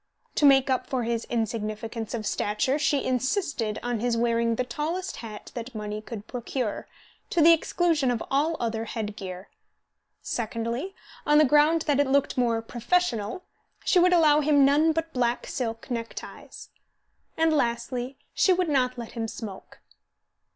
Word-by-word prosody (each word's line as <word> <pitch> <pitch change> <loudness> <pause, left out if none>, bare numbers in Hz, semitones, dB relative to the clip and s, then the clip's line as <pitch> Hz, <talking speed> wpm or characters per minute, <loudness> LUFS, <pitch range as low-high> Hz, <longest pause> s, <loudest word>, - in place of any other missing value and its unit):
To 290 - +4
make 270 -1 +5
up 255 - 0
for 260 -3 -1
his 230 0 -2
insignificance 225 0 -3
of 220 -2 -4
stature, 210 +7 0
she 290 -2 +1
insisted 255 - -1
on 240 -2 -1
his 240 +1 0
wearing 230 0 +1
the 255 - 0
tallest 310 +9 -3
hat 215 -3 -9
that 240 0 -7
money 210 0 -4
could 215 -1 -8
procure, 245 -2 -4 0.4
to 345 - 0
the 330 +1 +8
exclusion 325 -4 +1
of 240 -2 -1
all 305 +4 +1
other 225 -1 -2
head 215 -2 -4
gear; 185 -1 -8 0.7
secondly, 235 - -3 0.3
on 295 0 +4
the 305 - +7
ground 300 +4 +4
that 290 -2 +1
it 285 - +3
looked 275 +1 +2
more 235 -3 +1
"professional," 240 - -1 0.4
she 365 - +4
would 360 +1 +5
allow 305 -4 +5
him 290 -2 +4
none 300 +4 +4
but 325 +1 -3
black 245 -1 0
silk 230 0 -4
neckties; 230 -1 -7 0.7
and 320 0 +3
lastly, 245 0 -1 0.2
she 380 - +3
would 365 -2 +2
not 255 -3 +1
let 235 -2 -7
him 225 -2 -3
smoke. 210 -3 -9
245 Hz, 160 wpm, -26 LUFS, 230-295 Hz, 0.7 s, the